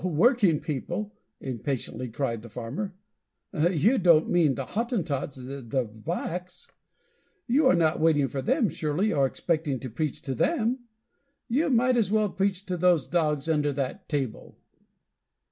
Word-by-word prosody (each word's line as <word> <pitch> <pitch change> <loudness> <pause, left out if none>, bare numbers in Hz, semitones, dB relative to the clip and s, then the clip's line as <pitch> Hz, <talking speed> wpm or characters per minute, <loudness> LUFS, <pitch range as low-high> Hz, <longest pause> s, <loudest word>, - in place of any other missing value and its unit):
"Working 185 - +3
people?" 175 +7 -4 0.3
impatiently 130 -1 -4
cried 115 -2 -2
the 115 - -11
farmer. 140 - -5 0.6
"You 180 - +3
don't 170 -4 +4
mean 160 -6 +3
the 135 - -4
Hottentots, 185 - -2
the 130 -1 -3
blacks! 175 +8 -5 0.7
You 265 +4 +3
are 260 - +5
not 160 -2 +2
waiting 155 -3 +3
for 135 +2 -4
them 250 - +2
surely, 165 +6 -1
or 135 -1 +3
expecting 155 -2 -1
to 130 - -6
preach 150 +4 -3
to 135 - -3
them? 245 - 0 0.6
You 285 +6 +1
might 250 0 +3
as 220 -5 +2
well 215 0 +2
preach 195 0 -1
to 180 -1 -2
those 175 -5 +3
dogs 155 -3 0
under 150 -2 +2
that 140 +8 -4
table!" 135 -7 -3
165 Hz, 145 wpm, -27 LUFS, 135-200 Hz, 0.7 s, are